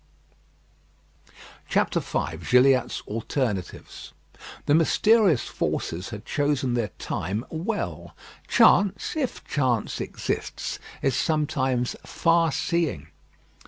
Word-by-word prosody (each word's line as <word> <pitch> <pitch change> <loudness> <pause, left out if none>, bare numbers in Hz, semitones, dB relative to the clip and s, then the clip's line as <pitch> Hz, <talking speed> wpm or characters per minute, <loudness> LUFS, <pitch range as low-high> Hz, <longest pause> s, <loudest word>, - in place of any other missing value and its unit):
V - - 0
GILLIATT'S 130 0 +4
ALTERNATIVES 110 -3 -4 0.5
The 145 - +3
mysterious 185 - +4
forces 85 +3 -3
had 105 -1 -8
chosen 145 -4 0
their 120 -3 0
time 100 +8 -3
well. 195 +7 -4 0.3
Chance, 200 - +4
if 280 -5 -3
chance 125 -6 0
exists, - - -4 0.2
is 135 -3 +2
sometimes 135 -5 0
far 165 -1 +2
seeing. 155 - -1
135 Hz, 85 wpm, -25 LUFS, 120-165 Hz, 0.5 s, GILLIATT'S